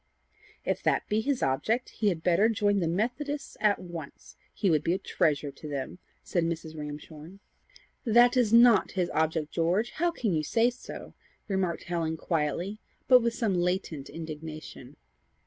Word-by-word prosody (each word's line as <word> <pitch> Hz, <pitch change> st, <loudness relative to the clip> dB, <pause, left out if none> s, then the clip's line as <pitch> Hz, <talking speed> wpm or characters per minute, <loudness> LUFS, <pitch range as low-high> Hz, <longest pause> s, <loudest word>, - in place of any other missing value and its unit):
"If -, -, -1 dB
that -, -, +1 dB
be 215 Hz, 0 st, +2 dB
his 275 Hz, +2 st, -1 dB
object, 215 Hz, -, 0 dB
he 210 Hz, -, 0 dB
had 165 Hz, -4 st, -3 dB
better 185 Hz, +5 st, +4 dB
join 205 Hz, -2 st, +2 dB
the 170 Hz, -, 0 dB
Methodists 245 Hz, -, -2 dB
at 210 Hz, -1 st, +3 dB
once. 170 Hz, -5 st, -9 dB, 0.2 s
He 200 Hz, -, -1 dB
would 155 Hz, -2 st, +2 dB
be 170 Hz, -, +1 dB
a -, -, +1 dB
treasure 145 Hz, -5 st, 0 dB
to 145 Hz, +3 st, -10 dB
them," 140 Hz, +5 st, -5 dB, 0.2 s
said 175 Hz, -, 0 dB
Mrs. 165 Hz, -1 st, -3 dB
Ramshorn. 150 Hz, +3 st, -8 dB, 0.7 s
"That 240 Hz, +1 st, +5 dB
is 240 Hz, -4 st, +3 dB
not 235 Hz, -3 st, +6 dB
his 180 Hz, -2 st, -1 dB
object, 160 Hz, -1 st, 0 dB
George. 180 Hz, +7 st, +1 dB
How 345 Hz, +2 st, +2 dB
can 235 Hz, -, -1 dB
you 155 Hz, -, +1 dB
say 230 Hz, +10 st, +2 dB
so?" 245 Hz, -, -10 dB, 0.3 s
remarked 190 Hz, -4 st, -1 dB
Helen 165 Hz, -2 st, -2 dB
quietly, 170 Hz, +6 st, -2 dB, 0.3 s
but 250 Hz, -1 st, +7 dB
with 230 Hz, 0 st, 0 dB
some 220 Hz, -5 st, 0 dB
latent 175 Hz, -5 st, -1 dB
indignation. 155 Hz, -4 st, -8 dB
180 Hz, 165 wpm, -28 LUFS, 160-225 Hz, 0.7 s, but